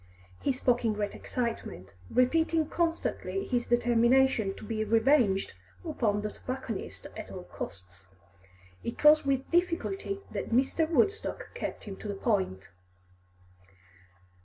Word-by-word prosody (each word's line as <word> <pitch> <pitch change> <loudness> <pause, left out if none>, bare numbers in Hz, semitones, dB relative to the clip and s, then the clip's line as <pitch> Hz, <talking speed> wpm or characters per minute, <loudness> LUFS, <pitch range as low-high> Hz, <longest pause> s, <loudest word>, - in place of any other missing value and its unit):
He - - +2
spoke 250 -2 +1
in 225 -2 +2
great 205 -1 -2
excitement, 225 - -4 0.2
repeating 320 +4 +2
constantly 340 +3 -1
his 245 -2 -1
determination 240 -2 +3
to - - -11
be 215 -1 -1
revenged 225 -2 +3 0.3
upon 210 -9 0
the 210 - -2
tobacconist 255 -4 -6
at - - -7
all - - -7
costs. 90 0 -9 0.8
It 235 - -5
was 300 0 +7
with 270 -1 0
difficulty 365 +3 0
that - - -4
Mr. 270 +6 +2
Woodstock 340 - 0
kept 485 - -5
him 195 -2 -7
to - - -8
the 200 - -3
point. 190 - -1
240 Hz, 125 wpm, -29 LUFS, 210-300 Hz, 0.8 s, was